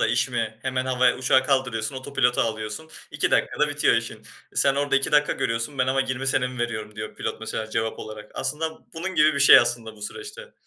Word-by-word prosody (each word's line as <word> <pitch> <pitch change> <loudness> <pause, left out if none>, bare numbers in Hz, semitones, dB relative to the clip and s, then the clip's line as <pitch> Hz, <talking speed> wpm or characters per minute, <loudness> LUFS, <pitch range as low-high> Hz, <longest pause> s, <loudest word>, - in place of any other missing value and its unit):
da - - +3
iş 120 +3 +1
mi 115 -3 -3
hemen 130 -1 -2
havaya 125 -1 +2
uçağı 130 +1 +3
kaldırıyorsun 130 -3 0
oto 130 +2 -8
pilota 125 -2 +3
alıyorsun 110 +7 -4 0.2
2 - - 0
dakikada - - +1
bitiyor - - +2
işin.", - - -3 0.3
"Sen 135 - +3
orada 140 0 +1
2 135 - -1
dakika 150 0 +4
görüyorsun 115 +4 -2
ben 130 - +2
ama 135 +1 +1
20 130 0 -2
sene 135 -2 +2
mi 125 0 -8
veriyorum." 110 -3 -4
diyor 105 0 -6
pilot - - -5
mesela 110 0 -4
cevap 110 0 -2
olarak. 105 0 -9
Aslında 160 +1 -3 0.2
bunun 185 +3 -3
gibi 155 0 +4
bir 140 - -1
şey 140 - +9
aslında 120 -2 -1
bu 105 - -12
süreçte. 425 - -8
130 Hz, 215 wpm, -24 LUFS, 115-140 Hz, 0.3 s, şey